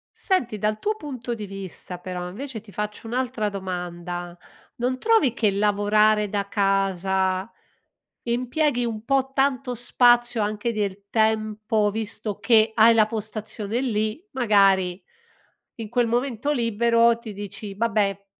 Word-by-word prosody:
Senti 250 - 0
dal 215 +1 -1
tuo 425 +1 -1
punto 255 - -6
di 215 -2 -6
vista 190 -2 -7
però 180 -1 -5
invece 235 +5 -6
ti 210 -2 -16
faccio 210 +2 -5
un'altra 240 -3 -1
domanda, 175 -2 -5 0.4
non 255 +2 -1
trovi 435 - +3
che 215 -4 +1
lavorare 210 +1 +2
da 200 -1 -2
casa, 190 -1 0 0.7
impieghi 245 +2 0
un 220 -1 -5
po' 270 -1 +1
tanto 270 -2 0
spazio 240 -1 +3
anche 210 +3 -1
del 200 -1 -3
tempo 215 -1 +1
visto 215 -1 -3
che 220 -2 +4
hai 230 +1 +7
la 220 -2 +5
postazione 215 0 -3
lì, 220 +2 -1
magari 195 -7 +3 0.7
in 225 -2 -7
quel 240 +1 +1
momento 245 +3 -1
libero 235 -1 +3
ti 230 -2 -9
dici: 205 0 -7
"Vabbè 205 -2 0
215 Hz, 130 wpm, -24 LUFS, 200-240 Hz, 0.7 s, hai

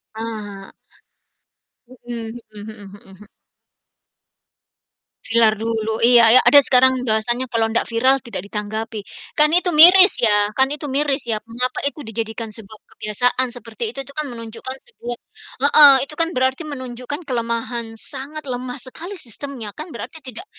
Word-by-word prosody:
Ah 220 - -7 0.3
hah. 195 -1 -11 1.2
Mhm 240 -2 -9 0.2
mhm 210 +1 -9
mhm 200 -2 -15
mhm. 200 +2 -16 2.0
Viral 225 -2 +3
dulu, 220 0 -3
iya 235 -1 +7
iya, - - +6
ada 285 - +7
sekarang 260 -1 +3
bahasanya 240 +4 0
kalau 225 -1 +1
ndak 230 - 0
viral, 260 +4 +2
tidak 235 -6 -7
ditanggapi, 215 +1 -5 0.4
kan 300 0 +5
itu 360 0 +3
miris 365 +5 +8
ya 210 -2 +3
kan 265 0 +4
itu 295 0 -7
miris 280 0 0
ya, 215 - +1
mengapa 250 +2 -2
itu 300 +1 -6
dijadikan 225 0 -5
sebuah 215 -1 -10 0.2
kebiasaan 245 +4 0
seperti 230 -2 -9
itu 275 - -8
itu 280 - -14
kan 305 - -1
menunjukkan 230 +3 -8
sebuah 240 - -8 0.5
heeh, 290 -1 +8
itu 300 - -10
kan 330 0 +1
berarti 260 +4 0
menunjukkan 255 +2 -7
kelemahan, 235 -1 -3
sangat 285 +6 -5
lemah 250 +1 -5
sekali 340 +10 -9
sistemnya 250 -3 -7
kan, 310 +3 -8
berarti 320 - -9
tidak 255 - -8
240 Hz, 145 wpm, -19 LUFS, 225-275 Hz, 2.0 s, miris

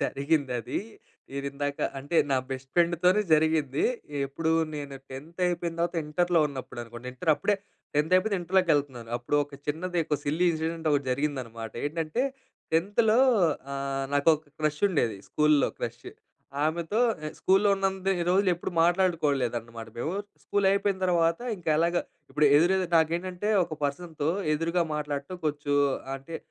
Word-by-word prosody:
జరిగిందది. 135 -4 -1 0.5
మీరిందాక 140 +1 -3 0.2
అంటే, 145 +5 -3
నా 135 - +3
బెస్ట్ 130 0 -6
ఫ్రెండుతోనే 175 +3 +3
జరిగింది. 155 -3 +1 0.4
ఎప్పుడూ 160 +4 -1 0.2
నేను 140 -2 -6
10థ్ 155 +7 -9
అయిపోయిన 170 -1 -2
తర్వాత, 170 +1 0
ఇంటర్‌లో 175 +2 +2
ఉన్నప్పుడనుకుంటా. 120 -3 -8
ఇంటర్ 160 +5 0
అప్పుడే, 205 +7 +1 0.4
10థ్ 150 +4 +1
అయిపోయింది, 200 +2 +2
ఇంటర్‌లోకెళ్తనాను. 145 -10 +1
అప్పుడు 120 +4 -1
ఒక 145 0 -14
చిన్నది, 170 +4 -1
ఒక 150 -3 0
సిల్లీ 160 +5 +1
ఇన్సిడెండొకటి 160 -3 -1
జరిగిందనమాట. 125 -5 -3
ఏంటంటే, 165 - -1 0.5
10థ్ 215 +7 +3 0.6
ఆహ్, 135 0 -2
నాకొక 150 +1 +3
క్రష్ 150 -1 0
ఉండేది 140 - 0
స్కూల్‌లో 150 -1 +3
స్కూల్‌లో - - -7
క్రష్. - - -5 0.6
ఆమెతో 165 +6 -1 0.3
ఎ - - -2
స్కూల్లో 195 +2 +3
ఉన్నంత 195 -1 -1 0.2
రోజులెప్పుడూ 185 -2 +1
మాట్లాడుకోలేదన్నమాట 135 -11 0
మేము. 155 +8 -2 0.3
స్కూలయిపోయిన 200 0 +1
తర్వాత, 165 -2 +2 0.2
ఇంకెలాగా 170 +1 +1 0.3
ఇప్పుడు 150 +2 +3
ఎదురెదురు 180 +2 +2
నాకేంటంటే, 175 +5 -1 0.2
ఒక 160 - -6
పర్సన్‌తో 155 +1 -2 0.2
ఎదురుగా 165 +3 +1
మాట్లాడటం 150 +3 -4
కొంచెం 145 -1 -1 0.4
అంటే, 135 +5 -7
155 Hz, 120 wpm, -27 LUFS, 140-175 Hz, 0.6 s, నా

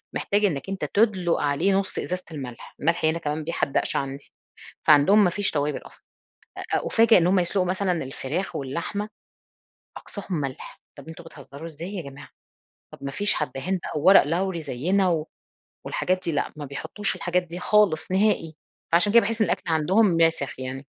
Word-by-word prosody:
محتاج 205 +1 +1
إنَّك 165 0 -2
أنت 195 - -3
تدلُق 195 -5 +1
عليه 150 +7 +1
نص 195 0 -1
إزازة 180 0 -3
الملح، 130 -6 -8
الملح 165 +1 +1
هنا 160 +2 +1
كمان 150 0 -3
بيحدّقش 160 -3 -1
عندي، 135 0 -4 0.6
فعندهم 175 +8 +6
ما 180 - +3
فيش 200 +2 -1
توابل 145 0 -1
أصلًا، - - -15 0.5
أ - - -4
أ - - -2
أُفاجَأ 225 -2 +5
إن 170 - +2
هم 185 +2 +3
يسلقوا 180 +1 +1
مثلًا 185 0 0
الفراخ 135 +7 -4
واللحمة 170 +10 -4 0.9
أقصاهم 190 -6 -5
ملح، 135 -2 -7 0.2
طب 140 - -12
أنتم 165 +1 -10
بتهزروا! 145 -1 -11
إزاي 165 +5 -7
يا 180 - -3
جماعة 140 -1 -11 0.6
طب - - -11
ما 140 - -3
فيش 205 +6 +2
حبّهان 155 +9 -2
بقى 150 - -3
وورق 190 +6 +7
لوري 170 +3 -1
زيّنا 165 +4 0 0.6
والحاجات 185 0 -1
دي 170 - 0
لأ، 145 - -1
ما 150 - -6
بيحطوش 160 +8 -3
الحاجات 180 0 0
دي 175 +1 -8
خالص 195 -5 +2
نهائي، 190 -5 +1 0.4
فعشان 190 +4 +4
كده 235 - +8
باحس 225 +2 -2
إن - - +5
الأكل - - -1
عندهم 185 +8 +3
ماسخ 165 -7 +1
يعني. 130 +2 -6
170 Hz, 170 wpm, -24 LUFS, 145-195 Hz, 0.9 s, كده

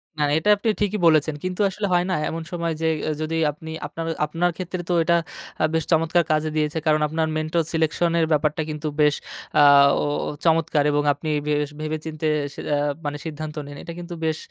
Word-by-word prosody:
না, 155 - -4
না - - +1
এটা 185 - 0
আপনি 215 +3 -1
ঠিকই 205 0 +1
বলেছেন। 155 -1 +3
কিন্তু 185 +2 -2
আসলে 205 +2 -3
হয় 175 0 +3
না। - - +1 0.2
এমন 165 0 -4
সময় 170 -1 -2
যে 160 - +1 0.3
যদি 155 +1 -2 0.2
আপনি 160 +2 -11 0.2
আপনার 165 +2 -6 0.2
আপনার 170 +4 0
ক্ষেত্রে 185 -1 -4
তো - - +2
এটা 170 +1 +3 0.6
বেশ 160 0 +1
চমৎকার 165 +1 +3
কাজে 155 0 +1
দিয়েছে। 155 0 0
কারণ 155 -1 +3
আপনার 160 +1 -1
mentor 155 +2 0
selection 160 +1 +1
-এর 165 - +3
ব্যাপারটা 150 +1 +1
কিন্তু 150 0 -4
বেশ 150 -1 +4 0.4
অ্যা 150 - +6 0.8
চমৎকার 160 -2 +3
এবং 145 0 +1
আপনি 150 +3 -6 0.2
বেশ 150 -1 +1
ভেবে 155 0 -2
চিন্তে 155 0 -3 0.3
সি - - -11
অ্যা 145 +1 -1 0.2
সিদ্ধান্ত 155 -1 -6
নেন। 145 0 -9
এটা 170 - -7
কিন্তু 175 0 -7
বেশ 160 -1 0
160 Hz, 190 wpm, -23 LUFS, 150-170 Hz, 0.8 s, অ্যা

